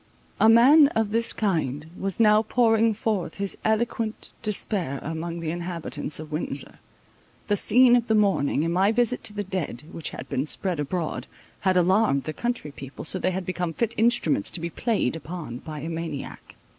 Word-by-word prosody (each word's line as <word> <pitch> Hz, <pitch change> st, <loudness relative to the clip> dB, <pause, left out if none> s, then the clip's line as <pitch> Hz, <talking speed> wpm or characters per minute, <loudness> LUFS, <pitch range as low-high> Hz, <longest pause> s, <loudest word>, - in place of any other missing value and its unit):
A 220 Hz, -, +6 dB
man 275 Hz, +7 st, +7 dB
of 220 Hz, -2 st, 0 dB
this 230 Hz, +1 st, +1 dB
kind 155 Hz, -, -1 dB
was 195 Hz, +2 st, -4 dB
now 215 Hz, -1 st, +5 dB
pouring 225 Hz, 0 st, +3 dB
forth 205 Hz, -6 st, -2 dB
his 200 Hz, -1 st, -2 dB
eloquent 220 Hz, 0 st, -1 dB
despair 195 Hz, -, -1 dB
among 165 Hz, +2 st, -4 dB
the 160 Hz, -1 st, -2 dB
inhabitants 170 Hz, -3 st, -3 dB
of 155 Hz, -1 st, -9 dB
Windsor. 155 Hz, +2 st, -3 dB, 0.7 s
The 205 Hz, -, +3 dB
scene 245 Hz, +4 st, +5 dB
of 240 Hz, -1 st, +1 dB
the 220 Hz, -, +2 dB
morning, 190 Hz, -8 st, +2 dB
and 165 Hz, -, -1 dB
my 190 Hz, +4 st, +3 dB
visit 245 Hz, +2 st, +1 dB
to 210 Hz, -, +1 dB
the 205 Hz, 0 st, -3 dB
dead, 180 Hz, -10 st, -4 dB
which 165 Hz, -, -5 dB
had -, -, -9 dB
been 135 Hz, +4 st, -2 dB
spread 180 Hz, 0 st, 0 dB
abroad, 155 Hz, +3 st, -3 dB, 0.3 s
had 190 Hz, -1 st, +1 dB
alarmed 180 Hz, -5 st, +3 dB
the 155 Hz, -, -4 dB
country 240 Hz, -10 st, -3 dB
people, 135 Hz, -1 st, -9 dB
so 185 Hz, -, +1 dB
they 185 Hz, -, +1 dB
had 185 Hz, 0 st, -3 dB
become 180 Hz, -2 st, -3 dB
fit 230 Hz, +5 st, -1 dB
instruments 220 Hz, -, +2 dB
to -, -, -1 dB
be 170 Hz, +1 st, -4 dB
played 210 Hz, -, -1 dB
upon 160 Hz, -6 st, -7 dB
by 155 Hz, 0 st, -8 dB
a 160 Hz, -, -5 dB
maniac. 165 Hz, -3 st, -6 dB
185 Hz, 180 wpm, -25 LUFS, 160-220 Hz, 0.7 s, man